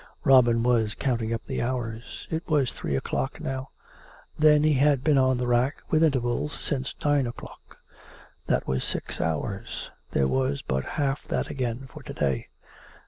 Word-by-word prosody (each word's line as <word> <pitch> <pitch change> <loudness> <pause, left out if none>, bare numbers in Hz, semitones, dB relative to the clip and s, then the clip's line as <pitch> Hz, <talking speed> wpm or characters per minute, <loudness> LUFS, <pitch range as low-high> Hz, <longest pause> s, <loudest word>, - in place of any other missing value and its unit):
Robin 120 -3 +5
was 115 -4 +2
counting 115 -4 -1
up 115 - -3
the - - -3
hours. 120 -2 -4
It 160 +1 -3
was 145 -6 +2
three 70 - -3
o'clock 135 - -2
now. 135 -3 -4 0.7
Then 150 -1 +5
he 155 0 +4
had 140 -1 +3
been 150 -3 +4
on 130 -1 +3
the 125 - -1
rack, 120 +3 +2 0.2
with 155 0 +4
intervals, 135 -1 0
since 135 -2 -2
nine 145 -3 +3
o'clock. 120 - -10 0.7
That - - +1
was 65 -1 0
six - - -2
hours. 80 +5 -3 0.2
There 70 - +2
was 135 - 0
but 65 0 -1
half 140 -1 -1
that - - -1
again 125 -1 -3
for 120 - -11
to - - -8
day. 70 -4 -1
130 Hz, 165 wpm, -26 LUFS, 115-140 Hz, 0.7 s, Robin